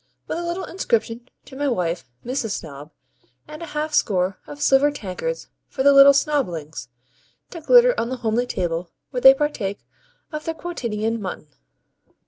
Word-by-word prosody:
with - - -4
a - - -3
little 345 +2 -3
inscription 235 - -2 0.2
to - - -13
my 285 +1 -1
wife, 175 - -2 0.2
Mrs. 245 -2 -2
Snob; 145 -1 -10 0.6
and 305 - -10
a 335 - -6
half 300 0 -3
score 190 -7 +1
of 290 - -9
silver 280 0 +4
tankards 290 - -5 0.2
for 265 - -3
the 280 0 +6
little 275 0 +9
Snoblings, 180 - -1 0.6
to 335 - -8
glitter - - +6
on 230 - -1
the 260 - -3
homely 235 +3 +1
table 170 -4 -3 0.2
where 250 - -3
they 265 +1 +9
partake 255 -9 -3 0.5
of 305 -1 -6
their 325 - -3
quotidian 230 -9 -3
mutton? 185 -5 -6
260 Hz, 160 wpm, -22 LUFS, 195-300 Hz, 0.6 s, little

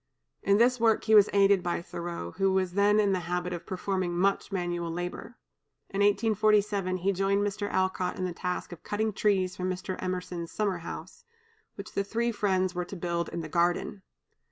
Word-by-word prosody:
In 200 0 +3
this 245 +2 +4
work 225 -1 +3
he 220 - +2
was 210 -1 +7
aided 200 -1 +4
by 175 -1 -1
Thoreau, 170 - -6
who 195 - +1
was 190 -2 0
then 205 +2 +4
in 205 -2 +3
the 185 - +1
habit 180 0 -1
of 170 - -7
performing 185 -2 -2
much 195 +3 +1
manual 175 -2 -2
labor. 175 +7 -5 0.5
In 195 - -3
1847 205 -2 +2
he 190 +2 +1
joined 195 +1 +1
Mr. 205 0 -2
Alcott 185 -1 0
in 185 - -2
the 180 - -3
task 180 +1 -4
of 175 - -9
cutting 215 +1 -1
trees 190 -3 +1
for 180 - -6
Mr. 185 0 -3
Emerson's 180 -2 -4
summer 200 -4 -1
house, 165 +1 -8 0.5
which 200 +1 -8
the 200 - -1
three 235 +4 -1
friends 190 -4 0
were 180 -1 -2
to 195 - -8
build 170 -1 -2
in 170 - -4
the 160 - -6
garden. 175 +4 0
190 Hz, 190 wpm, -28 LUFS, 180-205 Hz, 0.5 s, was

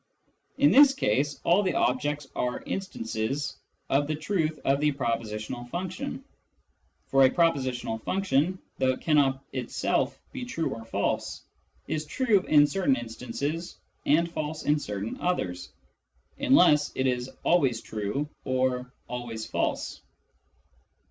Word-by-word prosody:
In 285 +1 +5
this 280 0 +7
case 140 +7 0
all 175 +4 +4
the 190 -2 0
objects 145 +3 0
are 125 0 -2
" - - -22
instances 135 - -3 0.2
" - - -46
of 145 +1 +3
the 155 - -1
truth 155 -1 -1
of 135 +1 +3
the 150 0 +3
propositional 115 -2 -3
function 190 - -4 0.4
— - - -43
for 135 0 +5
a 130 - +7
prepositional 130 -8 0
function, 185 - +1 0.2
though 130 -1 +3
it - - -9
cannot 140 -3 +2
itself 130 -3 -1
be 265 -2 -5
true 165 -10 -2
or 115 - -8
false, 100 -3 -2 0.4
is 155 -1 -2
true 225 - +3
in 145 -1 +7
certain 175 -4 +2
instances 125 +8 -4 0.3
and 165 +3 +3
false 155 -1 -4
in 150 +1 +2
certain 105 -4 -5
others, 95 - -1 0.7
unless 150 -1 +5
it 130 - 0
is 125 0 0
" - - -35
always 135 -9 +3
true 110 +7 -3
" - - -45
or 130 -1 0
" - - -42
always 120 -2 -5
fals.e." - - -2
140 Hz, 145 wpm, -27 LUFS, 125-165 Hz, 0.7 s, this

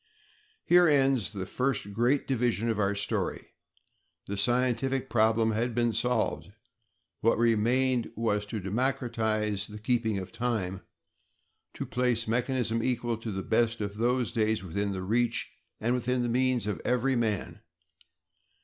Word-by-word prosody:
Here 175 0 +6
ends 135 - +3
the 100 -3 -5
first 125 -1 -2
great 120 +6 +1
division 120 -3 0
of 110 -2 -1
our 100 0 +1
story. 100 - -2 0.8
The 100 - -4
scientific 125 +4 0
problem 110 0 +3
had 115 +2 -1
been 120 -1 +1
solved; 125 +3 0 0.7
what 115 - +2
remained 120 +2 +2
was 105 -2 0
to 110 +1 -4
democratize 110 -1 -1
the 105 - -9
keeping 110 -1 0
of 95 -1 -6
time; 105 -7 -2 0.9
to - - -4
place 120 -1 0
mechanism 115 -1 0
equal 120 -1 -1
to 115 0 -5
the 95 -1 -4
best 115 0 +1
of 100 -1 -4
those 120 +1 +1
days 110 -3 0
within 100 +3 -2
the 95 -1 -4
reach 120 +5 0 0.3
and 120 +3 0
within 125 0 0
the 120 - -1
means 125 -1 +1
of 105 -6 -3
every 125 +2 +1
man. 110 -5 -2
115 Hz, 140 wpm, -29 LUFS, 105-125 Hz, 0.9 s, Here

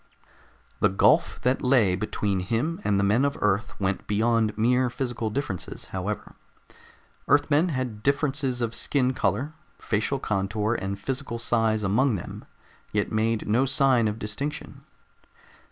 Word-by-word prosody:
The 105 - +4
gulf 95 - +3
that 125 +2 +1
lay 120 -8 +3
between 100 -1 -1
him 120 - -2
and 100 -1 +1
the - - +2
men 105 +6 +3
of 140 0 0
Earth 105 0 0
went 95 -1 -2
beyond 110 0 +1
mere 125 +3 +2
physical 120 -3 -3
differences, 110 -6 -4
however. 95 +3 -4 0.9
Earthmen 145 +4 +3
had 130 -7 -3
differences 140 -1 0
of 115 -1 -1
skin 130 +1 0
color, 125 +7 -1 0.2
facial 110 +6 -1
contour 105 -1 -1
and 100 +1 -3
physical 130 +2 -4
size 115 -2 +1
among 115 +5 +2
them, 85 - -7 0.5
yet - - -1
made 110 +1 0
no 120 +6 +3
sign 130 -3 +3
of 105 0 -2
distinction. 115 +8 -5
115 Hz, 135 wpm, -26 LUFS, 105-135 Hz, 0.9 s, The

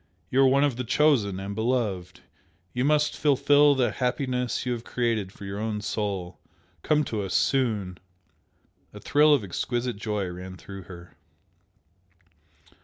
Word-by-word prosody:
You 135 - +4
are 135 - +6
one 135 +2 +4
of 140 -5 +1
the 125 - -2
Chosen 120 -7 +2
and 100 +1 -5
Beloved! 105 -6 -2 0.5
You 125 - -1
must 150 +1 +2
fulfil 145 0 +4
the 125 -4 +1
happiness 125 -1 -1
you 125 - -1
have 120 -1 -3
created 115 -7 -1
for 100 - -11
your 100 +1 -5
own 110 -1 -2
soul! 100 -4 -3 0.4
Come 150 0 +2
to 110 -6 -3
us 95 -2 -3
soon!" 105 -9 0 1.0
A - - -8
thrill 150 +1 +4
of 140 -7 +4
exquisite 120 +5 -3
joy 105 -2 -2
ran 90 +1 -8
through 95 -1 -10
her. 85 -1 -12
115 Hz, 150 wpm, -26 LUFS, 100-130 Hz, 1.0 s, are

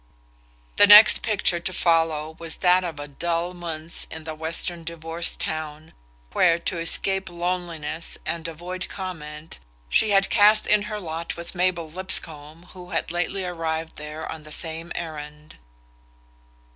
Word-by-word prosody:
The 205 - +7
next 210 +2 +9
picture 200 -5 +1
to 180 - -3
follow 160 -3 +1
was 165 -1 -5
that 180 0 +3
of 170 -3 -4
the 145 0 -7
dull 170 +4 -3
months 165 -2 -4
in 160 0 -9
the 160 0 -6
western 165 +2 -3
divorce 165 0 -1
town, 155 0 -5 0.4
where, 170 -2 +4
to 170 0 -3
escape 190 +3 +3
loneliness 170 -3 -4
and 170 -1 -4
avoid 175 +3 -7
comment, 160 -5 -8 0.3
she 220 - +3
had 195 -1 +3
cast 215 0 +5
in 210 0 +3
her 210 -1 -4
lot 165 -2 -6
with 170 - -5
Mabel 180 -2 0
Lipscomb, 160 -2 +1
who 180 -1 -11
had - - -2
lately 180 +2 -2
arrived 165 -2 -4
there 150 +1 -7
on 160 - -7
the 155 0 -13
same 165 +2 -2
errand. 150 -2 -8
170 Hz, 145 wpm, -24 LUFS, 160-180 Hz, 0.4 s, next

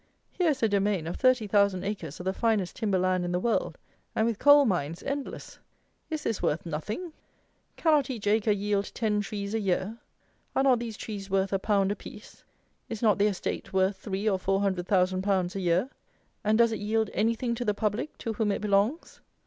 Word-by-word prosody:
Here 355 -3 +1
is 270 -5 -1
a - - +6
domain 200 -4 +1
of 170 - -4
thirty 255 -3 +3
thousand 200 -2 +2
acres 195 -7 -5
of - - -6
the 190 +1 -1
finest 215 -5 0
timber 205 -4 +1
land 185 0 +1
in 175 - -2
the 180 - 0
world, 230 +4 0 0.4
and 220 - +2
with 230 -3 -1
coal 285 0 +7
mines 170 - -1
endless! 280 0 -5 0.5
Is 315 -2 -3
this 225 - -2
worth 155 +4 0
nothing? 210 - -4 0.6
Cannot 300 -5 +2
each 230 -6 -5
acre 215 +1 +2
yield 205 0 0
ten 210 -3 +1
trees 200 0 -5
a 225 - +1
year? 195 +3 -1 0.6
Are 270 - +3
not 260 -3 +4
these 230 -2 -5
trees 200 -3 -6
worth 195 0 +1
a 195 - +2
pound 200 -1 +1
apiece? 205 - -9 0.5
Is 225 0 -5
not 210 -2 +4
the 205 - +4
estate 195 -1 -3
worth 190 +1 +2
three 200 0 -3
or 195 -3 +2
four 195 +1 0
hundred 185 -3 -1
thousand 185 -1 +2
pounds 190 -1 0
a - - -2
year? 180 +9 +1 0.5
And 215 +1 +3
does 230 -1 +4
it 220 - -3
yield 220 +1 0
anything 230 +2 0
to 240 +1 -3
the 210 -3 0
public, 215 +7 -2
to 225 - -1
whom 215 -1 0
it 200 - -2
belongs? 210 +9 0
205 Hz, 205 wpm, -28 LUFS, 190-225 Hz, 0.6 s, coal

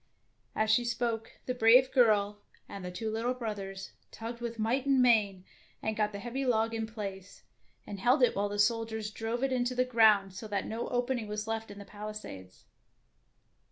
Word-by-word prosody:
As 215 0 +2
she 240 +3 +4
spoke, 235 -1 -2
the 250 - -1
brave 250 +2 +5
girl 210 -4 +3 0.3
and 195 - -8
the 180 - -4
two 220 +5 -4
little 235 +3 -1
brothers 200 -5 -5 0.2
tugged 235 +1 -7
with 235 -1 -4
might 245 +5 0
and 270 -1 +4
main, 210 -7 +3 0.3
and 220 0 -2
got 210 -1 0
the 200 - -6
heavy 240 +6 -4
log 225 -3 +1
in 225 -1 -2
place, 200 -4 -8 0.4
and 200 - -7
held 250 +6 +3
it 245 - +4
while 205 +1 0
the 205 - -4
soldiers 220 0 0
drove 225 +3 -3
it 270 - +1
into 250 0 0
the 255 0 +2
ground, 215 -5 +4
so 220 +4 -7
that 200 -2 -2
no 225 +2 -4
opening 245 -2 -1
was 210 +1 -4
left 225 0 -3
in 205 - -10
the 200 - -9
pali 210 +1 -7
sades. 95 - -10
225 Hz, 190 wpm, -30 LUFS, 205-240 Hz, 0.4 s, brave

